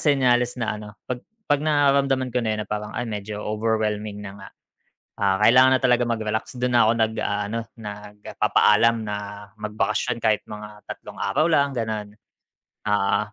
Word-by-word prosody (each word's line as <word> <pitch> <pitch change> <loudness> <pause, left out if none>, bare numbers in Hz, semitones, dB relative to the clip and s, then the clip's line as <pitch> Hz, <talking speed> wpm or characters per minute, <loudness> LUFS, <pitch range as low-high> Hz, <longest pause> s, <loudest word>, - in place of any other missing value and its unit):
senyales 125 -4 +2
na 115 -3 -1
ano 105 - -9 0.2
pag 125 -1 -4 0.2
pag 145 -5 +2
nararamdaman 140 -4 +2
ko 125 - +1
na 110 -2 -1
yun - - -3
na - - -24
parang 105 0 -4
ay 120 - -1
medyo 105 -1 -5
overwhelming 105 -1 -1
na 95 - -7
nga, - - -10 0.7
ah, 95 -1 +3
kailangan 130 +3 +7
na - - -12
talaga 125 -1 +4
mag-relax, 110 +2 -2
dun 125 0 +1
na 115 - +6
ako - - +5
nag, 110 -1 +1
aano, 105 +2 -1 0.2
nagpapaalam 105 +2 +1
na 105 0 -3 0.5
magbakasyon 105 +3 -1
kahit 110 -2 +2
mga 105 0 -9
3 - - -8
araw 155 - +1
lang 140 -2 +3
ganon. 110 -2 -3 0.8
Oo. 105 -1 +2
110 Hz, 160 wpm, -23 LUFS, 105-125 Hz, 0.8 s, kailangan